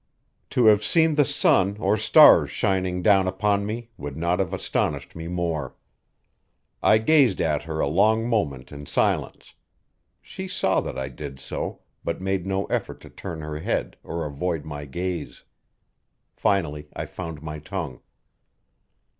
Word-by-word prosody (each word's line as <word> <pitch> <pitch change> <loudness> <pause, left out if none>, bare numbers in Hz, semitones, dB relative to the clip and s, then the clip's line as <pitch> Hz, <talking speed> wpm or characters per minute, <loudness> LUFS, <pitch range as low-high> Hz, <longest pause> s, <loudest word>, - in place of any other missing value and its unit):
To 125 - +2
have 105 -1 +6
seen 160 -1 +3
the 145 0 +4
sun 100 -4 +3
or 100 +2 +2
stars 110 - +7
shining 95 -2 -1
down 95 -2 +4
upon 100 +2 0
me 115 +2 -5
would 70 0 -7
not 85 +3 0
have 95 -3 0
astonished - - -2
me 80 0 -6
more. 85 -6 -3 1.1
I 110 - +5
gazed 125 - +4
at 75 -3 +1
her 80 -1 -4
a - - +1
long 110 +8 +3
moment 70 - -1
in 70 0 -9
silence; - - -1 0.7
she - - -8
saw - - +1
that - - -6
I 65 0 -3
did 70 0 -8
so, - - -5 0.2
but 85 - -3
made 95 -1 -2
no 95 0 -1
effort - - -3
to - - -13
turn 80 -2 -7
her 75 0 -5
head - - -2
or 85 -1 -4
avoid 75 +2 -3
my 75 -2 -6
gaze. 85 -2 -5 0.9
Finally 75 -7 0
I - - -3
found 80 -4 -7
my 75 -1 -6
tongue. 75 -5 -6
90 Hz, 155 wpm, -24 LUFS, 75-100 Hz, 1.1 s, stars